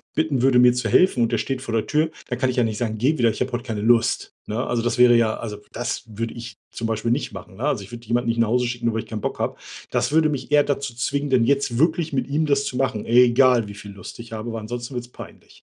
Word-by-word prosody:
bitten 155 -5 0
würde, 130 -1 +4
mir 125 0 +6
zu 125 - -2
helfen 135 -10 +4
und 115 - 0
der 115 - +1
steht 130 +4 -3
vor 120 -3 -5
der 110 -1 +1
Tür, 155 +2 +1 0.2
da 125 - -2
kann 130 +1 0
ich, 125 - -3
ja, 120 - +3
nicht 110 -2 -3
sagen: 110 -1 -2
„Geh 140 +8 +1
wieder, 120 -3 +3
ich 110 - -4
habe 125 0 -2
heut 120 0 -2
keine 110 -3 -4
Lust“, 115 +1 +2
ne? 110 +3 -2
Also 120 - -1
das 120 +1 -1
wäre, 125 -1 +7
ja 115 -2 +2
also 105 -3 -6
das 120 - -3
würde 115 +1 -5
ich 115 -3 -9
zum 115 - -4
Beispiel 115 +1 -1
nicht 135 - -1
machen, 95 0 -10
ne? 115 - -7
Also, 125 -9 0
ich - - -16
würd 120 0 -8
jemanden 120 +1 -1
nicht 115 0 0
nach 115 -2 +3
Hause 125 +1 +2
schicken, 120 -1 -3
nur 115 - 0
weil 110 - -2
ich - - -19
keinen 110 -2 -5
Bock - - -3
habe. - - -1 0.4
Das - - 0
würde 160 0 +4
mich 140 -3 -4
eher 145 -1 +5
dazu 140 -3 -2
zwingen, 140 +4 -2
denn 125 -3 +3
jetzt 140 -2 +1
wirklich 160 +1 +2
mit 130 -2 -1
ihm 150 +3 0
das 140 -1 +2
zu - - -4
machen, 125 -5 -1
egal 125 -1 +4
wie 100 - -9
viel 100 0 -10
Lust 100 +2 -10
ich 115 -1 -9
habe, 110 +2 -5
weil 115 - -4
ansonsten 120 +4 -6
wird's 120 -1 -5
peinlich. 125 - -13
120 Hz, 290 wpm, -22 LUFS, 115-135 Hz, 0.4 s, wäre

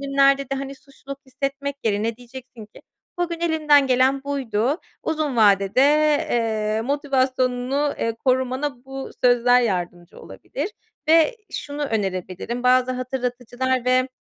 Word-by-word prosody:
günlerde 275 0 +3
de, 275 0 -4
hani, 275 0 -5
suçluluk 275 0 -11
hissetmek 275 +2 -4
yerine 220 +1 0
diyeceksin 250 -2 -12
ki, - - -17 0.4
"Bugün 340 -1 -2
elimden 305 -4 +3
gelen 265 +2 +2
buydu." 270 - -1 0.2
Uzun 310 -5 -2
vadede, 200 +1 +4 0.5
eee, 220 -2 0
motivasyonunu, 265 0 0
eee, 230 0 -1
korumana 260 0 0
bu 270 0 -7
sözler 245 0 +5
yardımcı 175 -5 -3
olabilir - - -6 0.4
ve 330 +8 +5 0.2
şunu 290 0 -5
önerebilirim, 200 +1 -3
bazı 255 0 +3
hatırlatıcılar 255 0 -2
ve, 255 +1 +2
255 Hz, 120 wpm, -22 LUFS, 240-275 Hz, 0.5 s, sözler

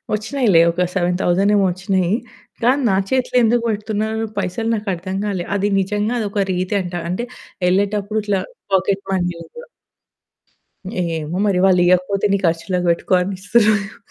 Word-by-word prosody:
ఒచ్చినయిలే 215 -5 +2
ఒక 180 +2 0
7000 180 +2 +1
ఏమో 200 -1 +3
ఒచ్చినయి. 185 -1 -1 0.5
కానీ, 260 +4 +3
నా 190 - +2
చేతిలో 255 -1 +1
ఎందుకు 235 +1 +2
బెడుతున్నారు 220 +1 -2
పైసలు 200 +4 -2
నాకర్థం 190 -3 -4
గాలే. 190 -4 -2
అది 205 +1 +1
నిజంగా 210 +4 -1
అదొక 200 -1 -1
రీతి 185 +3 -1
అంటా. 175 -1 -4
అంటే, 185 +7 -2 0.4
ఎళ్ళేటప్పుడు 205 +3 0
ఇట్లా 200 -2 0 0.3
పాకెట్ 195 +1 +1
మనీ 175 -2 0
లాగా. 475 - -11 1.4
ఏమో 165 0 -3
మరి! 195 -3 +2
వాళ్లియకపోతే 185 +2 +3
నీ - - +3
ఖర్చులకి 175 +2 0
బెట్టుకో 170 +2 -1
అని 195 +2 -2
ఇస్తుర్రేమో. 215 0 +2
195 Hz, 135 wpm, -19 LUFS, 180-215 Hz, 1.4 s, ఏమో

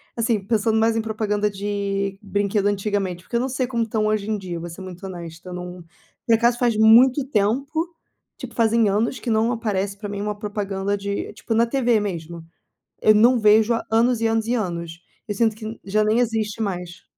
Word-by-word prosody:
assim, 230 -2 +1
pensando 220 0 +1
mais 225 0 +2
em 225 - +1
propaganda 210 -1 -1
de 200 -1 -3
brinquedo 205 0 0
antigamente, 200 -3 -1
porque 235 - -7
eu - - +3
não 260 +2 -1
sei 260 0 -1
como 240 -2 -2
estão 220 -1 0
hoje 215 -1 0
em 215 - 0
dia, 180 -4 -6
vou 170 +1 -6
ser 170 +3 -10
muito 185 0 -9
honesta, 170 -1 -9
eu - - -6
não. 180 0 -7 0.4
Por 230 - +5
acaso 235 +1 +2
faz 240 -3 +2
muito 245 +5 +6
tempo, 275 - 0 0.5
tipo 255 -4 -8
fazem 230 -2 +3
anos 220 +6 0
que 235 - -3
não 220 +2 +2
aparece 200 -4 -2
para 205 0 -6
mim 200 0 -5
uma 210 0 -3
propaganda 205 -2 -2
de, 200 0 -4
tipo 225 - -3
na 230 +1 +4
TV 240 -2 +2
mesmo. 170 -4 -5 0.6
Eu 215 - +5
não 235 +3 +5
vejo 215 +2 +5
há 230 - 0
anos 230 +1 +3
e 230 - +1
anos 225 0 0
e 240 - 0
anos. 170 -6 -3 0.3
Eu 205 - -3
sinto 220 +1 +1
que 220 0 -7
já 215 +2 +1
nem 215 +2 +2
existe 225 -3 -1
mais. 180 -4 -4
215 Hz, 205 wpm, -22 LUFS, 200-230 Hz, 0.6 s, muito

